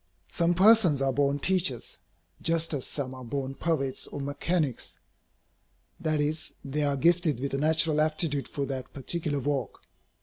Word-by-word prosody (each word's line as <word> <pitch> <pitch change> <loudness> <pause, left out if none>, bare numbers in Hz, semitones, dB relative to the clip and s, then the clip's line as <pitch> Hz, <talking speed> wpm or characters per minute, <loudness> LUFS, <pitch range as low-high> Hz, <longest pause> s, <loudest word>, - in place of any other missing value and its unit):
Some 170 +1 +1
persons 190 -6 +5
are 135 -1 +1
born 140 +1 +1
teachers, 170 - +1 0.4
just 165 -1 +2
as 140 -4 -2
some 130 -3 -3
are 130 0 -9
born 135 +2 -4
poets 135 -2 -1
or - - -7
mechanics. 145 0 -2 1.0
That 155 -2 0
is, 150 +2 -2
they 140 +2 -2
are 145 -1 +1
gifted 165 -2 +2
with 140 +1 -3
a 135 - 0
natural 155 0 +3
aptitude 155 -2 0
for 140 - -3
that 135 -2 -6
particular 145 +1 -2
work. 135 -4 -3
145 Hz, 155 wpm, -28 LUFS, 135-165 Hz, 1.0 s, persons